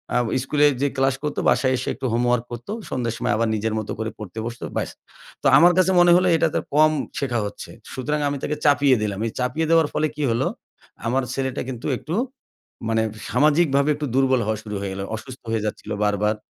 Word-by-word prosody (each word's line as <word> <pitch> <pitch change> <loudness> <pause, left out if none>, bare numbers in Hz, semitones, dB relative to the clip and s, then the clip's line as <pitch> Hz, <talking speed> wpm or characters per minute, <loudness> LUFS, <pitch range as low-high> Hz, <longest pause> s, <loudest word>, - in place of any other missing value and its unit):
আ - - +4 0.3
স্কুলে 145 +2 +2
যেয়ে 140 0 0
ক্লাস 135 0 +2
করতো, 150 - -2
বাসায় 130 -1 +2
এসে 125 - -5
একটু 135 - -6
হোমওয়র্ক 120 0 +1
করতো। 120 - -7 0.2
সন্ধ্যার 120 -3 -2
সময় - - 0
আবার 115 +1 +1
নিজের 110 +1 -1
মত 110 - -6
করে 110 0 -2
পড়তে 105 -1 -9
বসতো 120 0 -6
ব্যাস। - - -1 0.5
তো - - +3
আমার 175 +5 +7
কাছে 185 0 +4
মনে 175 0 +6
হলো 180 +1 +4
এটা 165 - +3
তো - - +3 0.2
কম 155 +1 +6 0.3
শেখা 125 -4 -1
হচ্ছে। 100 - -7 0.2
সুতরাং 150 +4 -2
আমি 140 - -2
তাকে 150 - -1
চাপিয়ে 140 -2 +5
দিলাম। 100 -2 -2
এই - - -4
চাপিয়ে 125 +6 0
দেওয়ার 165 -2 +5
ফলে 155 - +1
কি 150 - -3
হলো? 115 - +1 0.6
আমার 130 +3 +1
ছেলেটা 130 0 -2
কিন্তু 120 -3 -5
একটু 160 +7 -5 0.7
মানে 110 0 +2 0.3
সামাজিকভাবে 145 +2 +3
একটু 150 +1 -3
দুর্বল 130 -2 +3
হওয়া 110 0 -1
শুরু 105 -1 -6
হয়ে 100 -1 -3
গেল। 95 - -5
অসুস্থ 130 +3 -10
হয়ে 110 -2 0
যাচ্ছিল 105 0 -5
বারবার। 105 +1 +1
130 Hz, 205 wpm, -23 LUFS, 115-150 Hz, 0.7 s, আমার